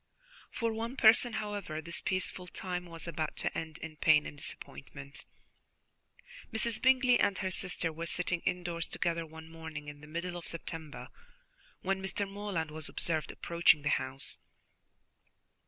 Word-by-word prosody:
For 230 Hz, -1 st, -1 dB
one 230 Hz, +3 st, -3 dB
person, 230 Hz, -1 st, +7 dB
however, 205 Hz, -7 st, -3 dB
this 170 Hz, +2 st, 0 dB
peaceful 185 Hz, -1 st, -1 dB
time 180 Hz, 0 st, -3 dB
was 165 Hz, 0 st, -6 dB
about 155 Hz, -2 st, -2 dB
to -, -, 0 dB
end 160 Hz, -1 st, -4 dB
in 160 Hz, -2 st, -7 dB
pain 150 Hz, -1 st, +6 dB
and -, -, -6 dB
disappointment. 70 Hz, -, -7 dB, 1.3 s
Mrs. 225 Hz, 0 st, +2 dB
Bingley 255 Hz, -1 st, +6 dB
and 200 Hz, -, +3 dB
her 190 Hz, -2 st, -1 dB
sister 180 Hz, -3 st, -1 dB
were 165 Hz, +2 st, -4 dB
sitting 175 Hz, +1 st, +1 dB
indoors 175 Hz, -1 st, -1 dB
together 165 Hz, -1 st, -1 dB
one 160 Hz, 0 st, -10 dB
morning 160 Hz, -2 st, -7 dB
in 145 Hz, 0 st, -10 dB
the 150 Hz, -, -11 dB
middle 175 Hz, +3 st, -3 dB
of 175 Hz, -, -7 dB
September, 165 Hz, -2 st, -4 dB, 0.7 s
when 190 Hz, 0 st, 0 dB
Mr. 195 Hz, +1 st, 0 dB
Morland 195 Hz, -6 st, -2 dB
was 155 Hz, 0 st, -2 dB
observed 155 Hz, -2 st, -1 dB
approaching 170 Hz, -3 st, +4 dB
the 145 Hz, -, +2 dB
house. 130 Hz, +1 st, -1 dB
170 Hz, 150 wpm, -33 LUFS, 155-195 Hz, 1.3 s, person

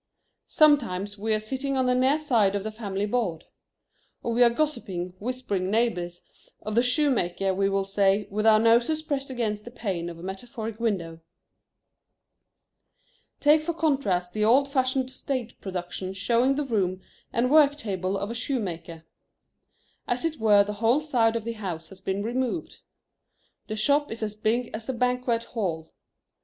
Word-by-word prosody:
Sometimes 220 Hz, -10 st, +3 dB
we 220 Hz, +2 st, -1 dB
are 215 Hz, -, +4 dB
sitting 265 Hz, +5 st, -3 dB
on 260 Hz, -, +2 dB
the 250 Hz, -, +3 dB
near 260 Hz, +4 st, +3 dB
side 230 Hz, -10 st, +2 dB
of 200 Hz, -, -2 dB
the 220 Hz, -, -4 dB
family 205 Hz, -2 st, -3 dB
board. 205 Hz, -8 st, -1 dB, 0.8 s
Or 235 Hz, -, -1 dB
we 240 Hz, -, +1 dB
are 240 Hz, -, +8 dB
gossiping 205 Hz, -10 st, -2 dB
whispering 210 Hz, -6 st, -2 dB
neighbors, 185 Hz, -6 st, -1 dB, 0.4 s
of 215 Hz, -, -4 dB
the 235 Hz, -, +4 dB
shoemaker, 245 Hz, -, +1 dB
we 195 Hz, +1 st, +1 dB
will 195 Hz, 0 st, 0 dB
say, 195 Hz, +1 st, +2 dB
with 215 Hz, +2 st, 0 dB
our 215 Hz, -1 st, +7 dB
noses 235 Hz, +8 st, +3 dB
pressed 280 Hz, -3 st, -3 dB
against 220 Hz, -5 st, -2 dB
the 240 Hz, -, -9 dB
pane 190 Hz, -8 st, -3 dB
of 170 Hz, -, -9 dB
a 165 Hz, -, -11 dB
metaphoric 220 Hz, +3 st, -6 dB
window. 180 Hz, -8 st, -2 dB, 2.2 s
Take 300 Hz, +1 st, +5 dB
for 335 Hz, +1 st, -3 dB
contrast 215 Hz, -, 0 dB
the 215 Hz, -, 0 dB
old 260 Hz, +6 st, +5 dB
fashioned 260 Hz, -1 st, 0 dB
stage 255 Hz, -3 st, -4 dB
production 185 Hz, 0 st, -5 dB
showing 235 Hz, +7 st, +2 dB
the 295 Hz, 0 st, -1 dB
room 190 Hz, -7 st, -1 dB, 0.3 s
and 250 Hz, +2 st, +1 dB
work 290 Hz, -2 st, +6 dB
table 195 Hz, -7 st, -2 dB
of 200 Hz, +3 st, -3 dB
a -, -, -3 dB
shoemaker. 180 Hz, -, -4 dB, 1.0 s
As 245 Hz, +5 st, -1 dB
it 315 Hz, -2 st, -2 dB
were 210 Hz, -2 st, +5 dB
the 210 Hz, +1 st, -4 dB
whole 240 Hz, +6 st, +4 dB
side 235 Hz, -7 st, +2 dB
of 230 Hz, -, -2 dB
the 230 Hz, +1 st, -3 dB
house 180 Hz, -7 st, -6 dB
has 190 Hz, -1 st, -14 dB
been 195 Hz, +1 st, -2 dB
removed. 255 Hz, +7 st, -2 dB, 0.9 s
The 215 Hz, -, -3 dB
shop 285 Hz, +7 st, +2 dB
is 225 Hz, 0 st, -5 dB
as 210 Hz, -1 st, -2 dB
big 225 Hz, +3 st, -1 dB
as 220 Hz, +3 st, -6 dB
a -, -, 0 dB
banquet 250 Hz, -1 st, 0 dB
hall. 170 Hz, -10 st, -4 dB
225 Hz, 165 wpm, -26 LUFS, 195-255 Hz, 2.2 s, are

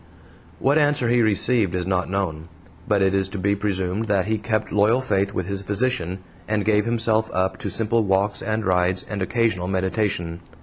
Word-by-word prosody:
What 140 Hz, +3 st, +2 dB
answer 145 Hz, -5 st, +2 dB
he 120 Hz, 0 st, +3 dB
received 110 Hz, -2 st, +2 dB
is 90 Hz, -1 st, -1 dB
not 90 Hz, -1 st, -1 dB
known, 85 Hz, -5 st, -3 dB, 0.4 s
but 100 Hz, -2 st, +2 dB
it 95 Hz, 0 st, +2 dB
is 95 Hz, -1 st, +1 dB
to 100 Hz, -, -6 dB
be 100 Hz, +2 st, +1 dB
presumed 100 Hz, +1 st, -2 dB
that 100 Hz, -3 st, +1 dB
he 110 Hz, +1 st, -1 dB
kept 110 Hz, 0 st, -2 dB
loyal 105 Hz, +4 st, +3 dB
faith 100 Hz, -6 st, 0 dB
with 90 Hz, -, -3 dB
his 100 Hz, +1 st, -3 dB
physician, 100 Hz, -3 st, -1 dB, 0.2 s
and 105 Hz, -1 st, 0 dB
gave 105 Hz, -1 st, +2 dB
himself 110 Hz, -1 st, +1 dB
up 95 Hz, +1 st, -1 dB
to -, -, -4 dB
simple 115 Hz, 0 st, +1 dB
walks 100 Hz, +1 st, 0 dB
and 110 Hz, -1 st, -2 dB
rides 90 Hz, 0 st, +1 dB
and 105 Hz, -2 st, -5 dB
occasional 110 Hz, -3 st, 0 dB
meditation. 95 Hz, -3 st, -1 dB
100 Hz, 185 wpm, -23 LUFS, 95-110 Hz, 0.4 s, he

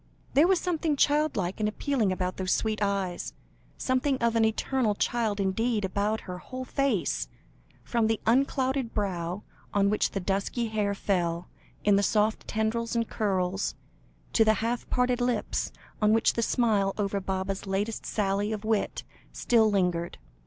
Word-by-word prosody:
There 295 Hz, +5 st, +6 dB
was 375 Hz, -2 st, +3 dB
something 325 Hz, -4 st, 0 dB
child 295 Hz, +2 st, +2 dB
like 185 Hz, 0 st, -2 dB
and 210 Hz, 0 st, +1 dB
appealing 230 Hz, -3 st, 0 dB
about 185 Hz, 0 st, -2 dB
those 185 Hz, -1 st, -1 dB
sweet 215 Hz, -1 st, 0 dB
eyes, 195 Hz, -3 st, -1 dB, 0.4 s
something 260 Hz, +1 st, +1 dB
of 235 Hz, -2 st, +1 dB
the 230 Hz, -, +2 dB
eternal 220 Hz, 0 st, 0 dB
child 220 Hz, -2 st, 0 dB
indeed, 210 Hz, +2 st, +1 dB
about 205 Hz, +3 st, -1 dB
her 180 Hz, -1 st, -7 dB
whole 255 Hz, +6 st, -7 dB
face, 200 Hz, -, 0 dB, 0.6 s
from 230 Hz, -2 st, +1 dB
the 225 Hz, -1 st, 0 dB
unclouded 265 Hz, 0 st, +1 dB
brow 185 Hz, -2 st, -2 dB, 0.3 s
on 200 Hz, 0 st, +3 dB
which 210 Hz, -, +2 dB
the 195 Hz, -, -3 dB
dusky 200 Hz, +5 st, -1 dB
hair 210 Hz, -2 st, 0 dB
fell 175 Hz, -3 st, -1 dB, 0.3 s
in 200 Hz, -1 st, +4 dB
soft 210 Hz, +2 st, +1 dB
tendrils 230 Hz, +2 st, -1 dB
and 230 Hz, -1 st, 0 dB
curls, 190 Hz, -2 st, -1 dB, 0.6 s
to 225 Hz, -, +5 dB
the 220 Hz, 0 st, +4 dB
half 230 Hz, +3 st, -2 dB
parted 250 Hz, 0 st, +1 dB
lips, 245 Hz, -3 st, -1 dB, 0.3 s
on 210 Hz, 0 st, +4 dB
which 225 Hz, -, +3 dB
the 235 Hz, -, -1 dB
smile 215 Hz, -5 st, +2 dB
over 200 Hz, -1 st, 0 dB
Baba's 190 Hz, +1 st, -3 dB
latest 205 Hz, +3 st, -2 dB
sally 205 Hz, 0 st, 0 dB
of 215 Hz, 0 st, -4 dB
wit, 220 Hz, -2 st, 0 dB, 0.3 s
still 225 Hz, -3 st, +3 dB
lingered. 180 Hz, -4 st, 0 dB
215 Hz, 155 wpm, -28 LUFS, 195-235 Hz, 0.6 s, There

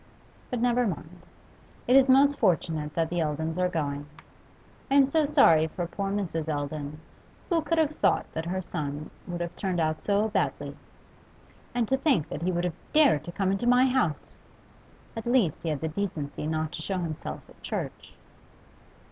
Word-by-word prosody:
But 250 Hz, -, -2 dB
never 245 Hz, 0 st, +2 dB
mind; 170 Hz, -1 st, -6 dB, 0.6 s
it 250 Hz, -, +4 dB
is 270 Hz, 0 st, +6 dB
most 280 Hz, +2 st, +5 dB
fortunate 160 Hz, -4 st, +1 dB
that 165 Hz, -1 st, 0 dB
the 175 Hz, -, 0 dB
Eldons 160 Hz, +2 st, -2 dB
are 180 Hz, 0 st, +2 dB
going. 145 Hz, -3 st, -3 dB, 0.8 s
I 275 Hz, -, +2 dB
am 280 Hz, -1 st, +7 dB
so 300 Hz, +2 st, +2 dB
sorry 165 Hz, -, +5 dB
for 175 Hz, +2 st, -4 dB
poor 195 Hz, +3 st, -3 dB
Mrs. 170 Hz, -6 st, -2 dB
Eldon; 145 Hz, 0 st, -3 dB, 0.5 s
who 335 Hz, -1 st, +3 dB
could 315 Hz, +2 st, -1 dB
have 310 Hz, -1 st, +2 dB
thought -, -, +2 dB
that 160 Hz, +1 st, -3 dB
her 185 Hz, +1 st, -2 dB
son 145 Hz, -2 st, -5 dB, 0.2 s
would 175 Hz, -1 st, -3 dB
turn 185 Hz, -3 st, -2 dB
out 155 Hz, -1 st, 0 dB
so 205 Hz, +2 st, +1 dB
badly! 145 Hz, -7 st, -1 dB, 1.0 s
And 240 Hz, -2 st, +1 dB
to 265 Hz, -, +2 dB
think 265 Hz, -, +1 dB
that -, -, -5 dB
he 180 Hz, +2 st, 0 dB
would 175 Hz, 0 st, -1 dB
have 180 Hz, -2 st, -1 dB, 0.2 s
dared 285 Hz, -, +5 dB
to 175 Hz, -, -6 dB
come 190 Hz, +1 st, 0 dB
into 195 Hz, +5 st, -1 dB
my 250 Hz, +1 st, +6 dB
house! 250 Hz, -, 0 dB, 0.8 s
At 225 Hz, 0 st, -5 dB
least 240 Hz, -, +2 dB
he 165 Hz, -, -2 dB
had 150 Hz, -3 st, -2 dB
the 160 Hz, -, -1 dB
decency 155 Hz, -5 st, -3 dB
not 155 Hz, 0 st, -1 dB
to 175 Hz, -, -6 dB
show 190 Hz, +3 st, -2 dB
himself 165 Hz, -4 st, -5 dB
at -, -, -19 dB
church. -, -, -5 dB
175 Hz, 180 wpm, -27 LUFS, 155-240 Hz, 1.0 s, am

